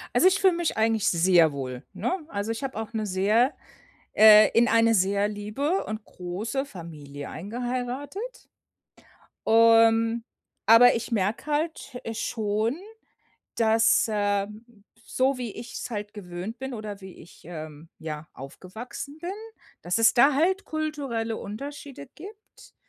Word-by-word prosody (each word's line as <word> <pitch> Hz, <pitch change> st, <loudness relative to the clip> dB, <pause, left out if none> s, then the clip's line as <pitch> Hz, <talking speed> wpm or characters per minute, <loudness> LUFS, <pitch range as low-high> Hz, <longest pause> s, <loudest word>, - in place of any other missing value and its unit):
Also, 370 Hz, -, +6 dB
ich 380 Hz, +2 st, +3 dB
fühle 380 Hz, -3 st, +4 dB
mich 340 Hz, -6 st, -2 dB
eigentlich 220 Hz, 0 st, +2 dB
sehr 170 Hz, -2 st, +4 dB
wohl, 130 Hz, -1 st, -6 dB
ne? -, -, -2 dB, 0.2 s
Also, 205 Hz, +3 st, -3 dB
ich 230 Hz, +5 st, -5 dB
habe 265 Hz, -5 st, -4 dB
auch 225 Hz, +1 st, -6 dB
'ne 215 Hz, -1 st, -2 dB
sehr 210 Hz, +8 st, +2 dB, 0.6 s
äh, 215 Hz, 0 st, +8 dB
in 240 Hz, +1 st, +4 dB
eine 230 Hz, 0 st, +4 dB
sehr 200 Hz, +2 st, +2 dB
liebe 215 Hz, -, -2 dB
und 215 Hz, 0 st, -6 dB
große 210 Hz, +10 st, -4 dB
Familie 150 Hz, -, -9 dB
eingeheiratet. 250 Hz, -, -5 dB, 1.0 s
Ähm, 225 Hz, 0 st, +5 dB, 0.4 s
aber 230 Hz, +3 st, +8 dB
ich 230 Hz, +2 st, -4 dB
merke 210 Hz, +5 st, -1 dB
halt, 300 Hz, -3 st, -3 dB
äh, 225 Hz, -, -5 dB
schon, 220 Hz, +3 st, -1 dB, 0.8 s
dass, 225 Hz, 0 st, +3 dB
äh, 205 Hz, -1 st, 0 dB, 0.6 s
so 260 Hz, +2 st, 0 dB
wie 235 Hz, -4 st, -4 dB
ich's 240 Hz, +1 st, -7 dB
halt 210 Hz, -1 st, -5 dB
gewöhnt 185 Hz, +3 st, -7 dB
bin, 265 Hz, -1 st, -5 dB
oder 210 Hz, -2 st, -7 dB
wie 190 Hz, -1 st, -11 dB
ich, 170 Hz, -, -16 dB
ähm, 155 Hz, -2 st, -9 dB
ja, 155 Hz, -1 st, -7 dB
aufgewachsen 220 Hz, -, -9 dB
bin, 350 Hz, +3 st, -4 dB, 0.5 s
dass 175 Hz, 0 st, -1 dB
es 225 Hz, -, +5 dB
da 275 Hz, +4 st, +5 dB
halt 375 Hz, +7 st, +1 dB
kulturelle 280 Hz, -8 st, -3 dB
Unterschiede 275 Hz, -, -8 dB
gibt. 410 Hz, +5 st, -14 dB
225 Hz, 135 wpm, -26 LUFS, 200-260 Hz, 1.0 s, äh